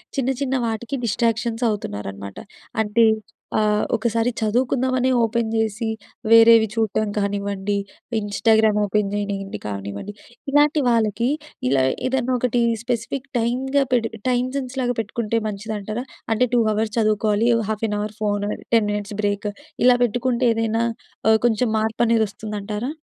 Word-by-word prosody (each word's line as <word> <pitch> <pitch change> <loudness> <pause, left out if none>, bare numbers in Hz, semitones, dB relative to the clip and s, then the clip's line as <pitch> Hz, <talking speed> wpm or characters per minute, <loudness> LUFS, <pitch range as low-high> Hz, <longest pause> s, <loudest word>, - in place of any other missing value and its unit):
చిన్న, 265 -2 0
చిన్న 265 -1 0
వాటికి 225 +4 -3
డిస్ట్రాక్షన్స్ 230 +1 0
అవుతున్నారనమాట. 100 - -5 0.5
అంటే 220 +2 +3 0.5
ఆహ్, 210 -1 +2
ఒకసారి 230 +1 0
చదువుకుందామనే 255 +3 +1
ఓపెన్ 230 0 0
చేసి, 225 0 -1 0.4
వేరేవి 230 0 +8
చూటం 215 -1 0
కానివ్వండి, 200 0 -1 0.4
ఇన్‌స్టాగ్రామ్ 215 +1 +2
ఓపెన్ 205 0 0
చేయనియండి 200 -1 -3
కానివ్వండి. 100 - -5 0.4
ఇలాంటి 295 +2 +4
వాళ్ళకి 230 -1 +2 0.4
ఇలా 135 0 +3 0.2
ఏదైనొకటి 250 -2 0 0.2
స్పెసిఫిక్ 245 +3 -3
టైమ్‌గా 265 +4 +1
పెడి 230 -2 +1 0.2
టైమ్ 250 0 +1
సెన్స్ 265 -1 -4
లాగా 245 -1 0
పెట్టుకుంటే 225 +1 -1
మంచిదంటారా? 215 +3 -5 0.3
అంటే, 250 +3 +2
2 240 - +4
అవర్స్ 215 0 -1
చదువుకోవాలి, 215 0 +2 0.2
half 220 +1 -2
an 210 - -1
hour 210 +1 -4
phone, 205 -1 0 0.3
10 220 -2 +3
minutes 205 0 -4
break. 205 0 0 0.4
ఇలా 250 -1 +6
పెట్టుకుంటే 245 +2 0
ఏదైనా 225 0 0 0.5
ఆహ్, 220 0 +5
కొంచెం 230 +1 +1
మార్పనేదొస్తుందంటారా? 220 0 -1
220 Hz, 120 wpm, -22 LUFS, 210-240 Hz, 0.5 s, వేరేవి